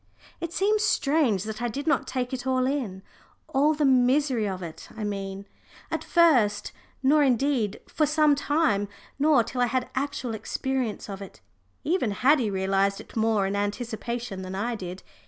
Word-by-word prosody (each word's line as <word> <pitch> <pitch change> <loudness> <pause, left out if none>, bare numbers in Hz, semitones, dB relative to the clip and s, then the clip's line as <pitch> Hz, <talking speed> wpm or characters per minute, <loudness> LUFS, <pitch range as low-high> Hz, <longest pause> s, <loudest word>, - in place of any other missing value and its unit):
It 335 - -4
seems 420 +3 +2
strange 275 - +2
that 220 +1 -6
I 240 - 0
did 275 +5 -4
not 325 - +1
take 255 -1 -3
it 255 0 -4
all 255 -1 +2
in 240 -9 -2 0.4
all 295 +3 +2
the 295 -1 +1
misery 255 -2 +3
of 185 -1 -5
it, 165 -2 -9
I 220 - -4
mean 195 -1 -4 0.5
at - - -2
first, 260 - +3 0.3
nor 295 +3 +5
indeed 255 -5 +1
for 305 - +1
some 305 0 +4
time, 285 -8 +1 0.3
not 285 -5 +4
till 250 - -3
I 245 - +4
had 250 +1 -2
actual 265 -3 -2
experience 250 +1 -3
of 200 -1 -7
it. 195 - -10 0.4
Even 325 - +1
Haddie 250 +3 +3
realised 195 0 +1
it - - -13
more 220 -3 +2
in 195 +1 -1
anticipation 220 0 -3
than 185 0 -6
I 230 +5 -1
did. 185 -4 -7
245 Hz, 170 wpm, -26 LUFS, 205-285 Hz, 0.5 s, nor